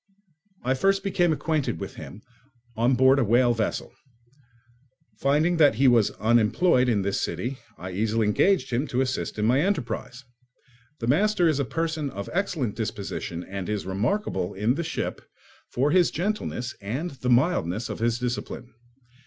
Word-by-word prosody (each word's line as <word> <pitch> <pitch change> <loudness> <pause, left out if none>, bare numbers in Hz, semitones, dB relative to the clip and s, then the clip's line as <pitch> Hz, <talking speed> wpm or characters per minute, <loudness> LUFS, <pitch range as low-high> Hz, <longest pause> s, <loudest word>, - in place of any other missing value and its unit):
I 130 +2 +1
first 195 +8 +1
became 175 -4 +2
acquainted 155 -1 -1
with - - -6
him 105 - -10 0.5
on 120 +3 +2
board 130 +2 +5
a - - +3
whale 120 +2 +3
vessel; 110 -2 -3 1.3
finding 155 +5 +2
that 145 -7 +5
he 135 +4 +4
was 120 -4 +5
unemployed 120 +5 +3
in 105 -4 +1
this 100 0 -1
city, 125 +2 -3 0.2
I 90 +3 -7
easily 110 +3 0
engaged 130 - +2
him 130 +6 0
to 125 - 0
assist 130 -3 -2
in 105 - 0
my 125 +5 +3
enterprise. 135 - -2 0.8
The - - -1
master 190 - +3
is 155 -3 +1
a 140 - 0
person 160 +1 -2
of 100 -5 -7
an - - -10
excellent 165 - -1
disposition 105 -6 -4
and 95 0 -6
is 105 -3 -2
remarkable 100 - -1
in 105 +5 +1
the 170 - -3
ship 160 - -4 0.5
for 140 +4 +1
his 180 -1 +4
gentleness 175 - -3
and 130 - -3
the 130 -2 -4
mildness 120 - +2
of - - -6
his 115 +1 +1
discipline. 125 0 -5
125 Hz, 160 wpm, -25 LUFS, 110-155 Hz, 1.3 s, board